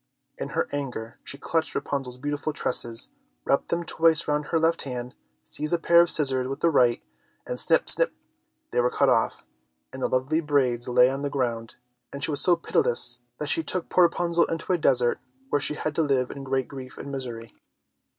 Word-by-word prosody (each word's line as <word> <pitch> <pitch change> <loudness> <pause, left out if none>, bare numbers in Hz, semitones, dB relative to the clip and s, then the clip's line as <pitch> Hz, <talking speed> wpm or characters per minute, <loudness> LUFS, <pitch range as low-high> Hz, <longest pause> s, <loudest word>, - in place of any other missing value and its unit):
In - - -5
her - - 0
anger 125 -6 -6
she 140 - -6
clutched 160 -1 -2
Rapunzel's 130 -3 -4
beautiful 145 +3 -4
tresses, 120 -4 +3 0.4
wrapped - - 0
them 170 0 -2
twice 165 -1 +2
round 150 0 -1
her 165 - -1
left 165 +1 +1
hand, 125 -2 -7 0.3
seized 150 - 0
a - - -1
pair 170 +1 +4
of 170 - +2
scissors 130 -4 +4
with 135 +1 -6
the 170 - +2
right, 125 -5 +2 0.4
and - - -5
snip, - - +3
snap, - - +8 0.6
they 485 - +1
were - - +1
cut 450 -2 +1
off, - - 0 0.5
and 130 - -8
the - - 0
lovely 130 +5 -1
braids 130 -6 -1
lay 125 0 +4
on 135 +1 -4
the 145 - -3
ground. 120 -5 -4 0.4
And 140 0 -6
she 155 - +1
was 145 - +4
so 180 - +4
pitiless 120 -6 +2 0.2
that 150 - -4
she 165 - +2
took 170 +3 -1
poor 180 - +4
Rapunzel 170 0 0
into 165 +3 -3
a - - +1
desert 125 -5 +2 0.3
where 145 - 0
she 150 - +2
had 155 0 -4
to 165 - 0
live 135 -4 0
in 140 - -9
great 130 -1 -2
grief 130 -2 -11
and 140 - -8
misery. 120 -4 -7
140 Hz, 200 wpm, -24 LUFS, 125-165 Hz, 0.6 s, snap